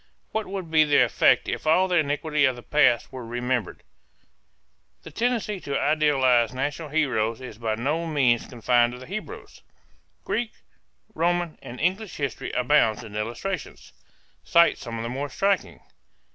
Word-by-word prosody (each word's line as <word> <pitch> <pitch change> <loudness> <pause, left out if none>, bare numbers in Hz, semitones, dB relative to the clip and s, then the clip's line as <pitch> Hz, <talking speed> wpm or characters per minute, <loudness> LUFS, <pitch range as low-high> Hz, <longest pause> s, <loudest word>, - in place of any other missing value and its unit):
What 220 -1 -2
would 190 -4 -6
be 155 -1 +6
the 145 -1 +4
effect - - +3
if - - -4
all 185 +4 +4
the 180 -1 +1
iniquity 150 0 +1
of 130 -2 +1
the 120 - -11
past 135 -5 +2
were 130 -2 -6
remembered? 120 -2 -3 1.2
The 160 - -10
tendency 225 +1 -1
to 140 -5 -3
idealize 130 -6 +2
national 145 +4 -3
heroes 120 -7 0
is 125 -4 -10
by 110 -2 -1
no 150 +9 -1
means 130 -7 +2
confined 120 -1 +2
to - - -8
the 130 - -11
Hebrews. 195 +7 -8 0.6
Greek, 235 -2 -2 0.6
Roman 175 0 -1
and 120 +1 -9
English 190 +5 -1
history 140 -5 -3
abounds 125 -3 +2
in 105 -2 -10
illustrations. 120 - -5 0.5
Cite 170 0 +4
some 115 -3 -6
of 115 - -4
the - - -3
more 140 +3 -4
striking. 195 +7 -1
145 Hz, 155 wpm, -25 LUFS, 120-165 Hz, 1.2 s, be